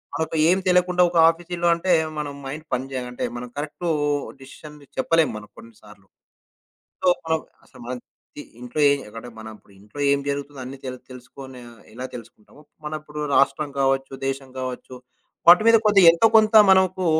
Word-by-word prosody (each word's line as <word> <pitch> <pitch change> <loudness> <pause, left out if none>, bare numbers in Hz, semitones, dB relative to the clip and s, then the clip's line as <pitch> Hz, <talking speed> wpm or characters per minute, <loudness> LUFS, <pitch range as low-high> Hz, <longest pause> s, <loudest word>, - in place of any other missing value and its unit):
మనకు 160 0 -3
ఏం 185 - +3
తెలియకుండా 180 0 +3
ఒక 170 - -3
ఆఫీసీలో 175 +1 -3
అంటే 175 +2 0 0.3
మనం 145 -1 -5
మైండ్ 150 +4 -7
పని 125 +1 -1
జేయ 130 -1 -3
అంటే 125 - -6
మనం 125 +1 -7
కరెక్టూ 155 +4 -5 0.5
డిసిషన్ 150 +3 -13 0.2
చెప్పలేం 165 +4 +2
మనం 105 0 -11
కొన్ని 115 0 -14
సార్లు. 105 -2 -18 0.9
సో, - - 0 0.2
మనం 160 0 0 0.3
అసలు - - -19
మన 125 - -5 0.4
తి - - -7 0.2
ఇంట్లో 125 +5 -4
ఏం 140 0 +1
అక్కడ 115 +2 -10
మనం 110 0 -9
ఇప్పుడు 100 - -24
ఇంట్లో 105 +7 -13
ఏం 140 - +2
జరుగుతుంది 140 0 -4
అన్నీ 130 +2 -9
తెలు 130 -1 -6
తెలుసుకొని 130 +1 -12 0.3
ఎలా 125 +3 -7
తెలుసుకుంటామో, 115 +3 -14 0.2
మన 150 - -5
ఇప్పుడు 150 0 -8
రాష్ట్రం 140 +1 +1
కావచ్చు, 135 0 0
దేశం 135 0 -5
కావచ్చు. 130 0 -7 0.5
వాటి 180 +5 +8
మీద 230 0 +7
కొద్ది 205 -2 +5
ఎంతో 170 +7 +3
కొంత 215 0 +3 0.2
మనకు 185 -1 +2
140 Hz, 170 wpm, -22 LUFS, 130-170 Hz, 0.9 s, వాటి